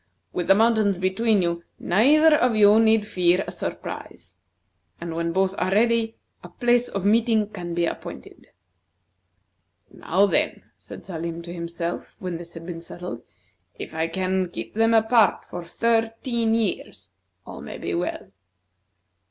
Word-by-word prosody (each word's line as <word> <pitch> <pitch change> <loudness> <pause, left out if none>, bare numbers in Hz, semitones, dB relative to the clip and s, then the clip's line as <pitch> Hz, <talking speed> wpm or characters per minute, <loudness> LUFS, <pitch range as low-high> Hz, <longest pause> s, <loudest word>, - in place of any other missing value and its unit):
With 175 - -2
the 195 - +6
mountains 215 -3 +3
between 190 +2 +1
you, 170 0 -2
neither 295 - +4
of 245 -5 +2
you 210 0 +6
need 220 -1 +4
fear 180 -2 +2
a - - -6
surprise; 85 +1 -7 0.6
and 170 -1 -5
when 170 0 -1
both 190 +2 +1
are - - 0
ready, 225 +2 +2 0.3
a - - -10
place 240 0 +1
of 195 -1 -4
meeting 220 0 +3
can 175 -4 -6
be 170 0 +1
appointed. - - -8 1.4
"Now, 190 +4 +1
then," 200 - 0
said - - -12
Salim 170 -1 -5
to 170 0 -8
himself 170 0 -5
when 180 -2 -5
this 170 0 -11
had 165 0 -9
been 170 -1 -6
settled; 170 -7 -7 0.6
"if - - -8
I 160 +1 -1
can 185 0 -1
keep 115 -8 -7
them 225 +1 +3
apart 225 0 +3
for 175 -1 -6
thirteen 225 +2 0
years, 225 -4 -3 0.3
all - - -9
may - - -8
be - - -4
well." - - -3
195 Hz, 150 wpm, -24 LUFS, 170-225 Hz, 1.4 s, the